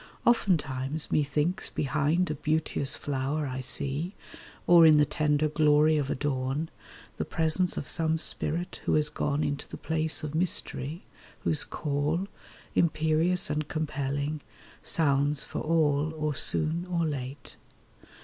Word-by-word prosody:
Oftentimes 155 - 0
Methinks 150 +6 0
behind 150 +5 0
a - - -1
beauteous 150 -2 -1
flower 145 +2 -3
I 130 -1 -4
see, 140 +8 0 0.5
Or 170 -1 +7
in 155 -2 +7
the 150 - +4
tender 150 +1 0
glory 150 0 +3
of 140 -2 -2
a - - -1
dawn, 135 +3 -2 0.5
The - - -1
presence 165 +3 0
of 140 - -4
some 160 0 +1
spirit 170 +2 -1
who - - +2
has 150 -1 +3
gone 150 0 -1
Into 145 -1 -3
the - - -9
place 160 0 -1
of 150 -1 -5
mystery, 160 -2 +1 0.4
whose 150 - +2
call, 150 +5 -2 0.5
Imperious 165 +3 +2
and 150 0 -2
compelling, 145 -1 -3 0.4
sounds 145 -2 +2
for - - -5
all 155 -2 +1
Or 155 -1 -1
soon 160 +4 +2
or 170 -2 0
late. 135 -2 -6
150 Hz, 135 wpm, -28 LUFS, 145-160 Hz, 0.5 s, Or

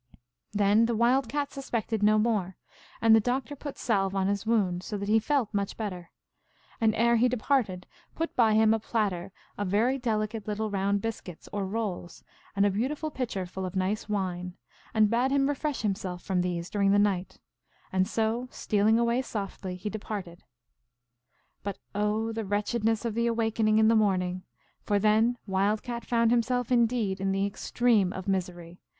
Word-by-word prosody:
Then 205 +2 +3
the 235 - 0
Wild 240 +2 +2
Cat 290 +1 -2
suspected 230 -5 -3
no 215 +1 +5
more, 210 -5 0 0.5
and 225 -1 +7
the - - +6
Doctor 250 +4 -2
put 285 0 -7
salve 195 -4 0
on 190 -1 +1
his 200 +2 -1
wound, 190 -6 +1
so 205 +2 -5
that 200 0 -4
he 220 +2 +4
felt 240 -2 0
much 200 -1 -2
better, 185 -6 -5 0.7
and, 220 -1 +3
ere 235 +1 +3
he 245 +2 +4
de 250 - -1
parted, 215 -8 0 0.3
put 330 +1 -3
by 225 -3 +4
him 220 0 +5
a 225 - +1
platter 200 -5 -2 0.3
of 205 - -1
very 230 +8 +2
delicate 215 -3 -2
little 215 0 -2
round 200 0 0
biscuits, 200 -7 -6
or 200 -2 -2
rolls, 195 -4 -4 0.3
and 200 0 +3
a 205 - +3
beautiful 290 +9 -2
pitcher 225 -9 -3
full 190 +1 -6
of 185 0 -5
nice 195 +3 -1
wine, 180 -3 -3 0.3
and 215 -1 +3
bade 245 +3 +2
him 275 0 +2
refresh 290 -1 -2
himself 190 -3 -3
from 185 -2 0
these 175 -1 -3
during 200 -1 +2
the 200 - +4
night, 195 -3 0 0.5
and 185 0 +2
so, 225 +3 -1
stealing 215 0 +2
away 235 +2 +2
softly, 195 -5 -5
he 185 +3 -6
departed. 200 -5 -6 1.2
But 200 -1 -4 0.2
oh, 210 +2 0
the 225 0 -3
wretchedness 215 +2 0
of 230 - -1
the 235 +1 +1
awaking 225 -2 +1
in 220 0 +5
the 225 - +5
morning! 185 -4 +1 0.4
For 205 - +1
then 220 +4 +3
Wild 200 +2 0
Cat 240 -1 -5
found 230 -1 +2
himself 245 +1 +1
indeed 230 -5 +1
in 195 0 0
the 195 +1 +1
extreme 205 -1 +1
of 190 0 -7
misery. 180 -2 -3
215 Hz, 180 wpm, -28 LUFS, 195-230 Hz, 1.2 s, and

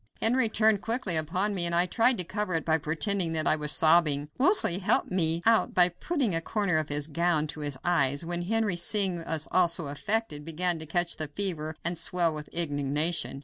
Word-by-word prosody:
Henry 230 0 +3
turned 220 -2 +2
quickly 225 -6 -1
upon 180 +7 -1
me, 185 -3 -2
and 170 - -3
I 175 +1 +2
tried 230 +6 +2
to 180 - +4
cover 185 0 -4
it 160 - -2
by 160 0 +1
pretending 165 +3 -1
that 155 -1 -2
I - - +2
was 150 -1 -1
sobbing. 155 -3 +2
Wolsey 275 - +4
helped 195 - +1
me 165 -2 +1
out 225 0 +2
by 180 -1 +5
putting 255 - -2
a 165 - 0
corner 195 -3 -1
of 155 - -5
his 145 0 -1
gown 160 0 -1
to 155 - -8
his 145 -3 -4
eyes, 145 -4 0
when 175 +1 -4
Henry, 215 +1 0
seeing 185 0 +1
us 160 -2 -2
all 180 -1 +4
so 165 -3 -1
affected, 155 0 -2
began 165 +2 -1
to 160 - -6
catch 175 +1 +1
the 155 - -3
fever 155 -2 -3
and 175 +1 +1
swell 170 0 0
with 150 -1 -8
indignation. 150 -1 -2
170 Hz, 210 wpm, -27 LUFS, 155-195 Hz, -, by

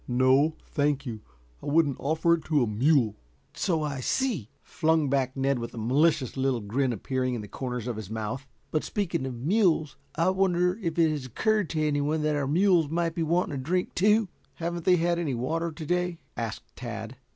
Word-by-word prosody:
"No, 130 +5 +3
thank 145 -1 0
you. 115 -4 -5 0.4
I - - -8
wouldn't 145 -2 +2
offer 160 +4 +2
it 170 - 0
to 150 -5 +2
a - - 0
mule." 115 0 +2 0.4
"So 165 -5 0
I 140 -3 -3
see," 185 - -1
flung 160 -4 +1
back 130 -1 0
Ned, 135 -1 +1
with 115 +1 -6
a - - -9
malicious 135 +4 +2
little 135 -2 +1
grin 125 +5 0
appearing 130 +3 -1
in 115 - -4
the 105 - -8
corners 125 0 -4
of 120 -3 -3
his 105 -3 -7
mouth. 110 +5 -4 0.2
"But 155 - 0
speaking 170 -9 -2
of 130 - -5
mules, 155 - +1 0.2
I 165 +4 +3
wonder 180 0 +1
if 165 -3 -2
it 165 -2 +4
has 145 -4 -4
occurred 210 - +1
to 155 -2 0
anyone 150 +1 0
that 155 0 +1
our 140 -2 -1
mules 170 0 +3
might 165 +1 0
be 165 - -3
wanting 170 0 +1
a - - -2
drink, 180 +7 -1
too." 210 +3 +3 0.3
"Haven't 170 0 -4
they 180 - +6
had 170 0 +1
any 150 -7 -1
water 165 +8 -1
to 155 0 -8
day?" 180 +1 0 0.2
asked 115 -2 -5
Tad. 115 0 -6
150 Hz, 200 wpm, -27 LUFS, 130-170 Hz, 0.4 s, they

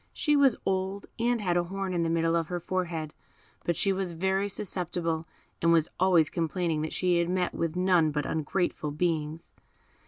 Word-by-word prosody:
She 295 -3 +2
was 275 -4 +5
old, 190 +1 -1
and 240 +1 +2
had 175 -3 +1
a 175 - +1
horn 195 +1 -3
in 175 - 0
the 165 - 0
middle 165 0 +2
of 165 -1 0
her 175 0 -3
forehead; 170 -3 -3 0.5
but 170 - 0
she 195 - +2
was 190 -2 -2
very 190 +4 0
susceptible, 170 -4 -2 0.3
and 170 - +4
was 165 -2 +4
always 175 -4 +5
complaining 165 -1 -1
that 155 - -3
she 180 -2 +2
had 170 0 0
met 180 -1 0
with 165 0 -2
none 180 -3 +3
but 150 0 -2
ungrateful 160 0 -1
beings. 155 0 -2
175 Hz, 185 wpm, -28 LUFS, 165-190 Hz, 0.5 s, was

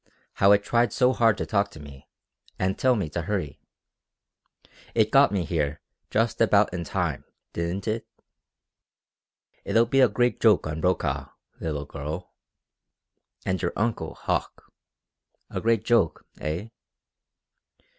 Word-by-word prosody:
How 100 0 +4
it 100 0 +5
tried 120 +1 +2
so 125 +2 +3
hard 115 -4 +3
to - - -2
talk 100 -1 +1
to 80 - -13
me, 70 -2 -13 0.5
and 95 +1 0
tell 130 -1 +3
me 100 -8 -1
to 85 - -3
hurry? 80 -6 -3 1.3
It 110 -1 +3
got 140 +1 +6
me 95 -4 -1
here 75 -2 -1 0.3
just 115 +2 0
about 105 -3 +4
in 90 -1 -3
time, - - -2 0.3
didn't 85 +4 -3
it? 110 +1 -2 1.6
It'll 115 +1 +3
be 135 +3 +1
a 125 - +6
great 120 +4 +1
joke 110 -3 +5
on 75 +1 -4
Brokaw, 70 -6 0 0.3
little 75 -3 -3
girl. 75 +6 -6 1.1
And 95 -1 -1
your 85 - -1
uncle 105 -8 -2
Hauck. - - -3 0.8
A - - -3
great 115 -1 +1
joke, 110 -9 +2
eh?" 85 +8 -4
100 Hz, 135 wpm, -26 LUFS, 80-115 Hz, 1.6 s, got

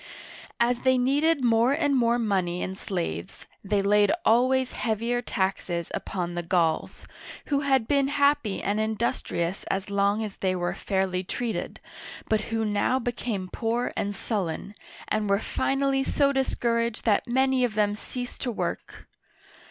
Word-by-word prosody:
As 240 +1 +2
they 260 0 +3
needed 280 +4 +2
more 235 +2 +4
and 290 -2 +1
more 240 -1 +3
money 190 -6 0
and 190 - -4
slaves, 100 - -4 0.2
they 200 0 +1
laid 205 +3 +4
always 255 +3 +3
heavier 235 +2 -1
taxes 190 -5 -2
upon 175 -2 -3
the 175 - -2
Gauls, 170 -2 0 0.4
who 285 -2 +2
had 270 -5 +2
been, 280 -1 +3
happy 280 -7 +1
and 205 +2 0
industrious 215 -5 -1
as 195 +1 -3
long 200 +2 +2
as 210 -2 -6
they 185 -1 0
were 175 -1 -1
fairly 190 -2 -1
treated, 230 +4 -4 0.5
but 220 -1 +2
who 225 -1 0
now 210 +4 +1
became 235 -6 -3
poor 230 +5 -2
and 205 0 -2
sullen, 195 -2 -3 0.3
and 215 -1 0
were 200 - +4
finally 270 +4 0
so 280 0 +2
discouraged 235 -4 0
that 220 +2 +2
many 260 +1 +2
of 235 -4 0
them 205 -1 +2
ceased 245 +3 -6
to 255 - -1
work. 220 - -5
220 Hz, 150 wpm, -26 LUFS, 195-255 Hz, 0.5 s, more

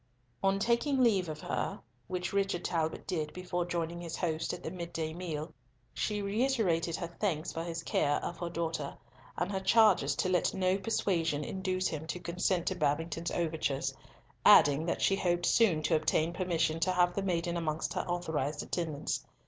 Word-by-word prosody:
On 195 0 +3
taking 235 +7 +1
leave 195 -7 +3
of 155 0 -6
her, - - -2 0.3
which 180 +2 -3
Richard 195 -3 0
Talbot 160 -2 -1
did 155 -5 -2
before 180 0 -2
joining 170 0 -2
his 165 -2 -5
host 160 -2 -1
at 180 - -7
the 160 - -4
mid 170 -2 -6
day 160 -1 -2
meal, 160 -3 -5 0.4
she 210 -1 -1
reiterated 200 -7 +1
her 170 -2 -6
thanks 175 -6 -1
for 165 - -3
his 165 -1 -4
care 145 -2 +1
of 175 - -5
her 175 - -3
daughter, 165 -4 -3 0.4
and 180 +3 -1
her 190 - -1
charges 215 +3 +4
to 185 - 0
let 180 0 +1
no 185 0 +2
persuasion 170 -7 0
induce 185 +1 -1
him 160 0 -5
to 165 +3 -3
consent 175 +1 0
to 190 - 0
Babington's 165 +2 -1
overtures, 160 -5 -1 0.5
adding 145 +3 +7
that - - -1
she 195 - +4
hoped 175 -2 +1
soon 175 -10 +4
to 160 +2 +3
obtain 160 +1 +1
permission 165 -3 0
to 185 +3 +2
have 180 -1 +3
the 200 - -1
maiden 175 -2 -1
amongst 160 -2 -2
her - - 0
authorised 160 -5 -2
attendants. 155 -4 -2
175 Hz, 180 wpm, -31 LUFS, 160-185 Hz, 0.5 s, adding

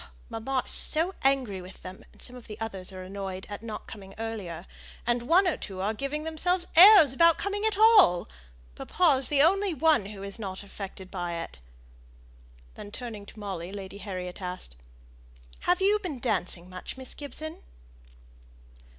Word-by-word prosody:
Mamma 255 +3 -2
is - - +1
so 330 +5 +3
angry 260 -9 +1
with 180 +1 -12
her, 185 +1 -8
and - - -23
some 250 - -6
of 250 - -12
the 210 - -9
others 195 -4 -4
are 185 -1 -8
annoyed 190 0 -6
at 205 0 -7
not 225 -2 -7
coming 195 -3 -11
earlier, 205 -7 -5 0.4
and 240 0 +1
one 345 +10 +4
or 350 - 0
two 190 -2 -7
are 200 +3 0
giving 275 +6 -3
themselves 345 +3 0
airs 360 - +9
about 335 +4 +5
coming 405 +1 -3
at 440 -3 +1
all. 425 - +6 0.5
Papa 310 - +2
is 265 - +3
the 285 -1 +4
only 390 +1 +2
one 305 -10 +3
who 200 -1 -9
is 200 +2 -8
not 190 -2 -6
affected 195 -1 -9
by 175 -2 -3
it." 165 - -7 1.1
Then 205 - -10
turning 215 -4 -7
to - - -14
Molly 190 -4 -5
Lady 200 0 -8
Harriet 185 -3 -6
asked, 180 - -7 0.9
"Have 360 +1 +3
you 410 +2 +4
been 355 -9 -5
dancing 185 -7 -2
much, 185 +7 -8
Miss 260 -1 -7
Gibson?" 310 +2 -7
225 Hz, 170 wpm, -28 LUFS, 190-315 Hz, 1.1 s, airs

